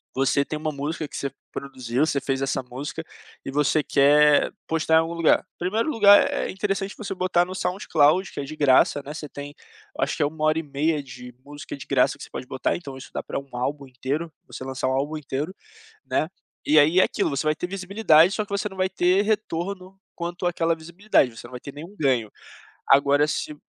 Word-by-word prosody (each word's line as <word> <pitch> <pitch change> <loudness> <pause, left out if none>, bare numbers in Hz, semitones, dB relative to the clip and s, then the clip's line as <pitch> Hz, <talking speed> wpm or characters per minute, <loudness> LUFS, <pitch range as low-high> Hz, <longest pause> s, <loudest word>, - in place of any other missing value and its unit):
você 135 +1 +2
tem 155 - -5
uma 155 0 -2
música 150 +2 -4
que - - -11
você 140 - -3 0.2
produziu, 130 0 -2
você 145 -3 0
fez 135 -1 -2
essa 135 -1 -1
música 135 +6 -6 0.4
e - - -4
você 150 +2 +2
quer 145 +1 +4 0.2
postar 160 0 +1
em - - +8
algum 165 +1 -1
lugar, 170 -2 +3
primeiro 215 - -1
lugar 205 -7 +6
é - - -2
interessante 195 0 -2
você 215 - -4
botar 180 -1 +2
no 185 +1 -7
sound 185 +2 -3
cloud 155 +5 +3
que - - -7
é - - -2
de 150 +3 -7
graça, 145 -1 +4
né, 145 - -7
você 150 0 -7
tem, 145 +1 -8 0.4
eu - - +1
acho - - -1
que - - -3
é - - +3
1 155 +1 -2
hora 155 +1 +3
e - - -4
meia 150 +1 0
de 125 -1 -11
música 145 0 -8
de 135 - -10
graça - - +2
que - - -10
você - - -11
pode - - -6
botar, 130 - -1
então 140 -6 -8
isso 130 - -11
dá - - -3
pra - - -4
um 140 0 -14
álbum 140 +3 -3
inteiro, 135 +6 -3 0.2
você - - -8
lançar 130 0 -3
um - - +1
álbum 145 +4 -1
inteiro, 150 +5 -4 0.5
né, 155 - 0 0.4
e 155 - +4
aí 160 +5 +5
é - - +7
aquilo, - - 0
você 140 +2 -2
vai 155 0 +2
ter 180 - -4
visibilidade 185 -3 +4
só 215 -1 -1
que 205 - -18
você 200 +1 -1
não 190 - -12
vai 185 0 +1
ter 185 +1 +2
retorno 195 -2 -3 0.2
quanto 175 +1 -4
aquela 170 -1 +1
visibilidade, 165 - 0
você 110 - -9
não - - -17
vai 125 - -7
ter 140 - -9
nenhum 165 +7 -10
ganho. 130 - +1 0.6
Agora 140 +2 +4
se 150 0 -3
155 Hz, 225 wpm, -24 LUFS, 140-180 Hz, 0.6 s, em